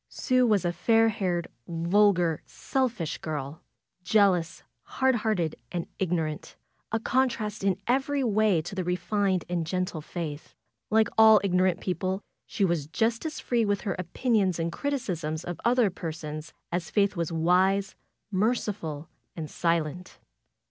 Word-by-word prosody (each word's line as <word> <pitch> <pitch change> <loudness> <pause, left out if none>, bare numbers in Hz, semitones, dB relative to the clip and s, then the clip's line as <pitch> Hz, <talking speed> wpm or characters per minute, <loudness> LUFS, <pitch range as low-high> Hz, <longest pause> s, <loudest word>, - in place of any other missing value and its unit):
Sue 255 -1 +2
was 205 -4 +2
a 175 - +1
fair 225 +5 +3
haired, 180 -5 -1 0.2
vulgar, 175 -1 +2
selfish 240 - -2
girl; 150 -1 -5 0.4
Jealous, 185 -4 +2 0.2
hard 265 0 +1
hearted 215 -9 0 0.2
and 175 -1 -3
ignorant; 165 -4 -2 0.4
a 225 - +1
contrast 225 -4 0
in 195 -2 +2
every 270 +3 +1
way 215 -7 +2
to 175 - -7
the 190 -1 -2
refined 180 +2 0
and 175 -1 -1
gentle 180 -2 -2
Faith. 155 -2 -6 0.3
Like 220 0 +3
all 220 -1 +8
ignorant 185 -1 +2
people, 185 +1 -1 0.3
she 200 - 0
was 170 -5 -1
Just 225 - 0
as 310 - -6
free 240 -2 +1
with 205 -2 0
her 195 -5 -2
opinions 190 +1 +1
and 165 0 -1
criticisms 175 - -3
of 175 -1 -6
other 235 -4 +3
per 170 -3 -5
sons 155 0 -7 0.2
as 175 -1 -2
Faith 200 -1 +2
was 170 -1 -2
wise, 185 +4 +2 0.4
merciful 195 -7 -1 0.3
and 155 -3 -6
silent. 170 +1 -1
185 Hz, 140 wpm, -27 LUFS, 170-215 Hz, 0.4 s, all